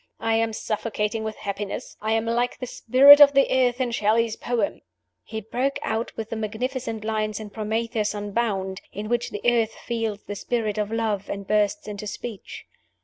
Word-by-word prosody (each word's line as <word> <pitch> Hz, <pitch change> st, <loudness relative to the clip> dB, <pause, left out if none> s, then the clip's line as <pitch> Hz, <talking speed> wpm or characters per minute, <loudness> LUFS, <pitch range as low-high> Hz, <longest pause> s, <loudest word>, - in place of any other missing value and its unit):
I 225 Hz, -, 0 dB
am 225 Hz, 0 st, +2 dB
suffocating 215 Hz, 0 st, -2 dB
with 220 Hz, 0 st, -4 dB
happiness 200 Hz, 0 st, -5 dB
I 215 Hz, +1 st, 0 dB
am 225 Hz, 0 st, +1 dB
like 240 Hz, +2 st, 0 dB
the 255 Hz, -, -5 dB
Spirit 275 Hz, +4 st, +7 dB
of 285 Hz, -1 st, +9 dB
the 275 Hz, 0 st, +5 dB
Earth 255 Hz, -1 st, +2 dB
in 250 Hz, -2 st, 0 dB
Shelley's 225 Hz, 0 st, +2 dB
poem." 245 Hz, +3 st, -2 dB, 0.4 s
He 220 Hz, -1 st, -6 dB
broke 250 Hz, +6 st, -1 dB
out 225 Hz, +1 st, -2 dB
with 225 Hz, -1 st, -5 dB
the -, -, -2 dB
magnificent 225 Hz, +1 st, -3 dB
lines 215 Hz, -1 st, -1 dB
in 210 Hz, -1 st, -8 dB
"Prometheus 220 Hz, 0 st, -1 dB
Unbound," 205 Hz, -2 st, -2 dB
in 210 Hz, +2 st, -6 dB
which 240 Hz, 0 st, 0 dB
the 205 Hz, -, -6 dB
Earth 230 Hz, -2 st, +2 dB
feels 225 Hz, -3 st, -2 dB
the 205 Hz, -, -6 dB
Spirit 215 Hz, 0 st, -2 dB
of 210 Hz, 0 st, -2 dB
Love, 220 Hz, -3 st, -1 dB
and 200 Hz, 0 st, -4 dB
bursts 215 Hz, +8 st, +1 dB
into 210 Hz, 0 st, -6 dB
speech. 220 Hz, 0 st, -7 dB
220 Hz, 180 wpm, -24 LUFS, 210-235 Hz, 0.4 s, of